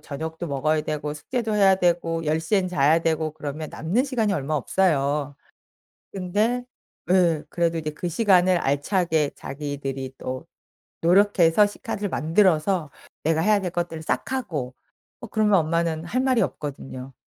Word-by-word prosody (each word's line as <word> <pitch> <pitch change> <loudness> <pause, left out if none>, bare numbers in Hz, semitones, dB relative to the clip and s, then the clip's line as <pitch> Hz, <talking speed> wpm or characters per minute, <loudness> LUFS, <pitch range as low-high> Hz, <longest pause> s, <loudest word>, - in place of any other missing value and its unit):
저녁도 160 +3 -6
먹어야 155 +2 0
되고, 150 -1 -3
숙제도 220 - -3
해야 195 -2 +5
되고, 170 -2 0
10 155 +1 +1
시엔 185 +3 +1
자야 155 -1 +3
되고 160 -1 0
그러면 155 0 -6
남는 195 - 0
시간이 230 -7 0
얼마 150 -3 -2
없어요. 145 -3 0 0.8
근데 210 +7 0 0.4
네 170 -4 +3
그래도 170 -1 0
이제 155 -1 -3
그 175 +4 -5
시간을 185 -2 +4
알차게 155 +1 +1
자기들이 135 -2 -5
또 130 0 -5 0.6
노력해서 185 +1 +4
시간을 205 -1 -4
만들어서 165 -1 +2 0.3
내가 160 +1 +2
해야 210 +2 +3
될 180 -2 -3
것들을 170 -2 -3
싹 260 - -2
하고 150 - -3 0.5
어 235 - -7
그러면 210 -3 +3
엄마는 165 0 -1
할 235 +9 -1
말이 260 -3 +2
없거든요. 135 -2 -5
165 Hz, 315 characters per minute, -24 LUFS, 150-190 Hz, 0.8 s, 해야